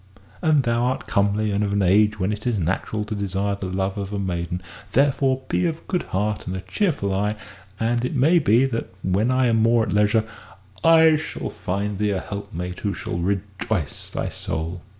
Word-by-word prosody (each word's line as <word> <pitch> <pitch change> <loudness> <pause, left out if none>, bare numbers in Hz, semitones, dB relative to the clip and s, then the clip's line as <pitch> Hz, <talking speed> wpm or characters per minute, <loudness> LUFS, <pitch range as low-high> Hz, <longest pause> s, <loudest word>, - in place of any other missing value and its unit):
And 155 -4 +3
thou 120 0 +1
art 130 +1 -1
comely, 105 +1 +1
and 100 +1 +1
of 100 -1 -1
an 100 -1 +2
age 105 +3 +4
when 95 +2 0
it 105 +3 -4
is 120 -3 +1
natural 95 +4 -1
to 110 - -4
desire 100 0 -1
the 100 -1 -4
love 95 +1 -2
of 100 0 -4
a 105 - -2
maiden. 90 -2 -2 0.3
Therefore 135 -1 +2
be 180 - +1
of 165 -1 -4
good 180 - 0
heart 105 +1 -1
and 90 - -3
a 95 - -4
cheerful 100 - -1
eye, 105 +2 0 0.4
and 120 +1 +1
it 125 +5 -2
may 155 +7 +5
be 125 -2 +4
that, 115 -7 -3
when 100 +6 +1
I 130 0 +3
am 115 -2 +3
more 115 +1 +4
at - - -2
leisure, 105 +2 +3 0.6
I 160 -1 +6
shall 155 - -5
find 100 +2 -3
thee 105 0 +1
a 100 -2 0
helpmate 90 -3 -6
who 100 -2 -2
shall 85 - -4
rejoice 100 -2 -2
thy - - -3
soul." 80 +2 -4
105 Hz, 200 wpm, -23 LUFS, 95-120 Hz, 0.6 s, I